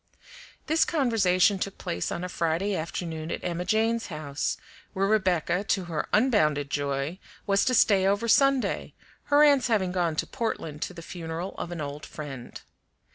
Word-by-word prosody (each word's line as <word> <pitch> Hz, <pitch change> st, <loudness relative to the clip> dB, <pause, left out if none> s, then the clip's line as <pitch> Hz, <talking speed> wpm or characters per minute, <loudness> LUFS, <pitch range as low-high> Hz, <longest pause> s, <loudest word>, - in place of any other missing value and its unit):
This 315 Hz, +1 st, +3 dB
conversation 205 Hz, -, +2 dB
took 195 Hz, +1 st, -4 dB
place 85 Hz, -, -3 dB
on 175 Hz, -, -3 dB
a -, -, -2 dB
Friday 180 Hz, +3 st, -1 dB
afternoon 160 Hz, -1 st, -4 dB
at -, -, -4 dB
Emma 175 Hz, 0 st, -2 dB
Jane's 225 Hz, +2 st, +1 dB
house, 150 Hz, -4 st, -3 dB, 0.4 s
where 195 Hz, +1 st, +1 dB
Rebecca, 185 Hz, -3 st, +1 dB
to 195 Hz, -2 st, +1 dB
her 165 Hz, -4 st, -3 dB
unbounded 155 Hz, -, +2 dB
joy, 140 Hz, +4 st, -2 dB, 0.3 s
was 200 Hz, 0 st, +3 dB
to 255 Hz, -, +2 dB
stay 195 Hz, -4 st, +4 dB
over 205 Hz, +4 st, +1 dB
Sunday, 275 Hz, +2 st, +2 dB, 0.3 s
her 290 Hz, +1 st, +5 dB
aunts 285 Hz, -4 st, +5 dB
having 200 Hz, -6 st, +1 dB
gone 175 Hz, -3 st, 0 dB
to -, -, 0 dB
Portland 190 Hz, -, -4 dB
to 180 Hz, -, -4 dB
the 170 Hz, -, -9 dB
funeral 165 Hz, +2 st, -5 dB
of 175 Hz, -, -5 dB
an 170 Hz, -2 st, -4 dB
old 145 Hz, +1 st, -6 dB
friend. 135 Hz, -5 st, -8 dB
180 Hz, 165 wpm, -27 LUFS, 160-215 Hz, 0.4 s, her